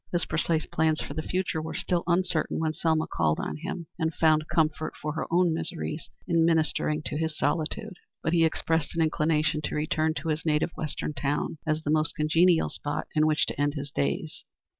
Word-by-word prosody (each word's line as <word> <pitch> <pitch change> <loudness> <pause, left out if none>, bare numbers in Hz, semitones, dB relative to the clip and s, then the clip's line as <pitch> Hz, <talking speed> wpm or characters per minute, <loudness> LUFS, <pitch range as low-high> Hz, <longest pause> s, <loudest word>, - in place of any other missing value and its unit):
His 175 -1 +1
precise 160 0 0
plans 155 -1 +1
for - - -5
the 155 - -2
future 180 -1 -1
were 160 - -5
still 175 -1 0
uncertain 180 -2 +1
when 160 -1 0
Selma 160 0 +1
called 80 -2 0
on - - -3
him, 175 +1 -5
and 160 -1 +1
found 155 -1 +3
comfort 155 -1 0
for 150 0 -3
her 160 - -3
own 175 0 +3
miseries 165 -1 -3 0.2
in 165 -2 +3
ministering 160 -2 +2
to - - -3
his 160 -1 -2
solitude, 165 +7 -1 0.3
but 160 - 0
he 165 -1 +4
expressed 160 0 0
an 165 - +3
inclination 155 -1 +1
to - - -3
return 155 +1 0
to 150 +3 -3
his 155 0 -1
native 155 +1 +1
Western 150 0 -3
town, 145 +3 -2
as 155 0 0
the 150 - 0
most 155 -1 +1
congenial 165 +3 +3
spot 145 0 -3
in 155 0 +3
which 155 -1 +3
to - - -3
end 145 +1 +1
his 140 -1 -5
days. 70 0 -2
155 Hz, 200 wpm, -27 LUFS, 150-165 Hz, 0.3 s, he